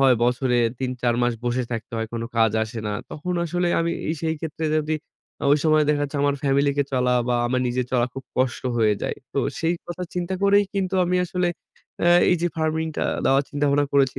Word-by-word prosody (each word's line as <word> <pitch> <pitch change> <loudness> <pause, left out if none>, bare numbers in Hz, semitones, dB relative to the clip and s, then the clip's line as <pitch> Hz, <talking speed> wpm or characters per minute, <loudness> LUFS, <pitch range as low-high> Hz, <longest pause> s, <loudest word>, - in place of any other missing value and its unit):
হয় 135 -2 +6
বছরে 125 0 +1 0.2
৩ 130 -1 -2
৪ 120 -1 +2
মাস 120 0 +2
বসে 120 +1 0
থাকতে 115 +1 -5
হয় 115 0 -2
কোনো 115 0 -3
কাজ 115 -1 +4
আসে 115 +1 -5
না। 105 - -1 0.2
তখন 180 +4 -4
আসলে 175 +1 0
আমি 170 0 0 0.3
সেই 160 -1 0
ক্ষেত্রে 160 0 -4
যদি 155 0 0 0.6
ওই 145 - +6
সময়ে 155 -1 +4
দেখা 145 -1 +2
যাচ্ছে 145 +1 -5
আমার 145 0 +2
family 140 +1 +3
কে 145 - +3
চলা 125 -1 +2 0.2
বা 125 - +2
আমার 125 +1 0
নিজের 125 0 -1
চলা 120 -1 +3
খুব 135 -1 -7
কষ্ট 130 -1 0
হয়ে 110 -2 +4
যায়। - - -2 0.2
তো - - -1 0.2
সেই 165 +1 +1
কথা 175 +1 -5
চিন্তা 180 +1 -2
করেই 200 +1 +5
কিন্তু 190 -1 -1
আমি 180 - +1
আসলে 180 0 0 0.6
এ - - +6 0.2
এই 180 - +4
যে - - +3
farming 160 0 0
টা - - 0 0.2
দেওয়ার 135 +1 +4
চিন্তাভাবনা 145 0 +1
করেছি 135 -3 +2
140 Hz, 210 wpm, -23 LUFS, 125-165 Hz, 0.6 s, হয়